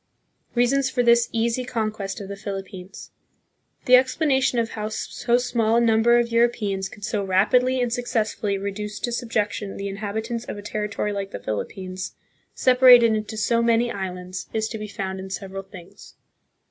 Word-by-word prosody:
Reasons 260 Hz, +3 st, +2 dB
for 250 Hz, -1 st, 0 dB
this 235 Hz, 0 st, +4 dB
Easy 235 Hz, +2 st, 0 dB
Conquest 215 Hz, -5 st, -3 dB
of 200 Hz, -, -7 dB
the 200 Hz, -, -6 dB
Philip 195 Hz, -1 st, -6 dB
pines. 190 Hz, +1 st, -10 dB, 0.7 s
The 250 Hz, -, +2 dB
explana 265 Hz, +2 st, +4 dB
tion 255 Hz, -, +1 dB
of 230 Hz, -1 st, 0 dB
how 215 Hz, -1 st, -4 dB
so 235 Hz, +2 st, -1 dB
small 235 Hz, -2 st, +1 dB
a -, -, +5 dB
number 235 Hz, +1 st, +4 dB
of 235 Hz, -1 st, +1 dB
Europeans 215 Hz, -5 st, +1 dB
could 205 Hz, 0 st, -8 dB
so 210 Hz, -2 st, -1 dB
rapidly 250 Hz, +7 st, +3 dB
and 245 Hz, -2 st, 0 dB
suc 245 Hz, 0 st, -3 dB
cessfully 215 Hz, -4 st, -1 dB
reduce 210 Hz, +1 st, -5 dB
to 240 Hz, -, -2 dB
sub 235 Hz, 0 st, -4 dB
jection 205 Hz, -2 st, -2 dB
the 200 Hz, 0 st, -4 dB
inhabitants 220 Hz, +4 st, -4 dB
of -, -, -6 dB
a 205 Hz, -, -8 dB
territory 210 Hz, 0 st, -3 dB
like 200 Hz, -1 st, -4 dB
thePhil 110 Hz, -, -4 dB
ippines, 185 Hz, -1 st, -7 dB, 0.4 s
separated 250 Hz, -3 st, +7 dB
into 215 Hz, 0 st, -3 dB
so 230 Hz, +2 st, +2 dB
many 235 Hz, +1 st, +2 dB
different 200 Hz, -4 st, -4 dB
islands, 180 Hz, 0 st, -6 dB
is 220 Hz, 0 st, 0 dB
to 220 Hz, -, -6 dB
be 215 Hz, -, -5 dB
found 190 Hz, -2 st, -5 dB
in 190 Hz, 0 st, -7 dB
several 195 Hz, 0 st, -5 dB
things. 195 Hz, 0 st, -14 dB
215 Hz, 185 wpm, -23 LUFS, 195-240 Hz, 0.7 s, separated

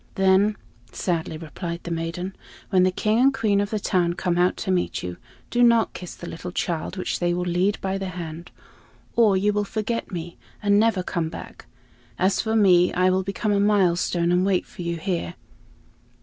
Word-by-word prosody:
"Then," 195 Hz, +2 st, +3 dB, 0.3 s
sadly 165 Hz, -3 st, -2 dB
replied 170 Hz, +2 st, -6 dB
the 170 Hz, -, -6 dB
maiden, 170 Hz, +3 st, -3 dB, 0.4 s
"when 185 Hz, -, +4 dB
the 185 Hz, -, +4 dB
King 215 Hz, +4 st, +1 dB
and 270 Hz, +2 st, +5 dB
Queen 215 Hz, -6 st, +1 dB
of 205 Hz, -, -2 dB
the 215 Hz, -, -1 dB
town 175 Hz, -3 st, +1 dB
come 175 Hz, -1 st, -1 dB
out 180 Hz, +1 st, +2 dB
to 190 Hz, -, -2 dB
meet 180 Hz, -1 st, -1 dB
you, 90 Hz, -1 st, -5 dB, 0.3 s
do 240 Hz, -, +1 dB
not 235 Hz, -2 st, +4 dB
kiss 180 Hz, -, -8 dB
the 170 Hz, -, -9 dB
little 175 Hz, +2 st, -6 dB
child 175 Hz, +1 st, -3 dB
which 185 Hz, -, -2 dB
they 175 Hz, 0 st, +1 dB
will 180 Hz, 0 st, -2 dB
lead 180 Hz, +3 st, +1 dB
by 195 Hz, 0 st, -2 dB
the 195 Hz, -, -3 dB
hand, 170 Hz, -1 st, -7 dB, 0.7 s
or 215 Hz, -5 st, +5 dB
you 205 Hz, +2 st, +2 dB
will 205 Hz, 0 st, +1 dB
forget 220 Hz, +3 st, -3 dB
me 170 Hz, -1 st, -6 dB, 0.2 s
and 205 Hz, -1 st, +3 dB
never 215 Hz, -4 st, +2 dB
come 165 Hz, -3 st, -2 dB
back. 165 Hz, -, -10 dB, 0.5 s
As 190 Hz, +2 st, +2 dB
for 220 Hz, 0 st, -1 dB
me, 180 Hz, -5 st, +5 dB
I 185 Hz, +1 st, +3 dB
will 190 Hz, +1 st, +2 dB
become 195 Hz, +3 st, -2 dB
a 200 Hz, -, +2 dB
milestone 180 Hz, -4 st, +2 dB
and 180 Hz, +1 st, +3 dB
wait 190 Hz, -2 st, +1 dB
for -, -, -11 dB
you 170 Hz, 0 st, -2 dB
here." 170 Hz, -, -3 dB
185 Hz, 195 wpm, -24 LUFS, 175-205 Hz, 0.7 s, and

